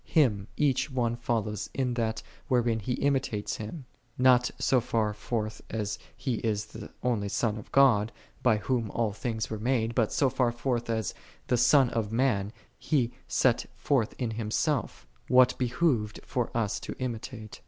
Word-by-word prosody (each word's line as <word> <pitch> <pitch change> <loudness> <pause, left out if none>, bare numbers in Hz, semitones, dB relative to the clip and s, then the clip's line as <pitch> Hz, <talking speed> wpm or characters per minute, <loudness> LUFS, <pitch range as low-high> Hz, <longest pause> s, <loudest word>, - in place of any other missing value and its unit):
Him 110 - +2
each 145 -1 +2
one 120 -3 0
follows 110 -3 -2
in 130 -2 0
that, 110 -2 -1 0.2
wherein 120 -3 +2
he 115 +4 -2
imitates 135 -7 0
Him: 125 +7 -7 0.3
not 125 -1 +5
so 130 -2 +3
far 110 -2 0
forth 110 0 -3
as 105 -2 -3 0.2
He 130 -5 -1
is 105 -2 -1
the 110 0 -10
only 115 -5 0
Son 110 +1 0
of 105 - -10
God, 115 -6 +5 0.3
by 120 -4 +4
Whom 115 0 -1
all 110 -2 -1
things 110 0 -3
were 110 - -3
made; 115 -1 +1
but 115 -2 +1
so 140 - +3
far 125 -2 +1
forth 120 0 -2
as, 110 -4 -1 0.3
the - - +2
Son 130 +1 +5
of 110 -2 -1
Man, 115 -5 +1 0.3
He 125 -6 +1 0.2
set 125 -3 +2
forth 130 -7 0
in 120 -3 -2
Himself, 110 - -1 0.2
what 125 0 +5
behoved 125 -4 +1
for 125 -3 -1
us 105 -3 0
to - - -6
imitate. 115 -3 -5
115 Hz, 165 wpm, -29 LUFS, 110-130 Hz, 0.3 s, not